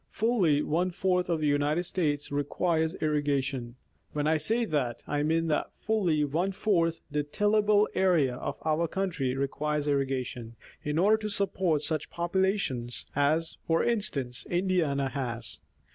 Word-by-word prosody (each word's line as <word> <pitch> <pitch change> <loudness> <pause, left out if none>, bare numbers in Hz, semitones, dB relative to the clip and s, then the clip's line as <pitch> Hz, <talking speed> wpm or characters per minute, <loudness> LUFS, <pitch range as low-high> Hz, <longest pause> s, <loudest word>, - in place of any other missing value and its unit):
Fully 190 -10 +2
one 175 +4 +1
fourth 180 0 0
of 165 -2 0
the - - +1
United 145 +4 +1
States 150 -6 -1
requires 160 +3 0
irrigation. 140 -5 -1 0.4
When 150 0 -1
I 160 +1 +3
say 225 +10 +1
that, 130 - -2
I 145 0 -1
mean 160 +2 +1
that 150 - 0
fully 185 -9 +1
one 170 +7 0
fourth 170 -5 +1
the 150 +1 +1
tillable 210 +6 +2
area 165 -9 +2
of - - -4
our 160 +2 +1
country 160 -9 -1
requires 145 +2 -1
irrigation, 130 -4 -2 0.3
in 150 +1 -2
order 205 +5 +5
to 215 -1 -4
support 190 -6 +1
such 155 -3 -1
a - - -41
population 175 - 0 0.3
as, 155 +3 +1
for 165 0 +2
instance, 175 - -1
Indiana 175 -7 +1
has. 120 -4 -4
155 Hz, 145 wpm, -29 LUFS, 145-185 Hz, 0.4 s, order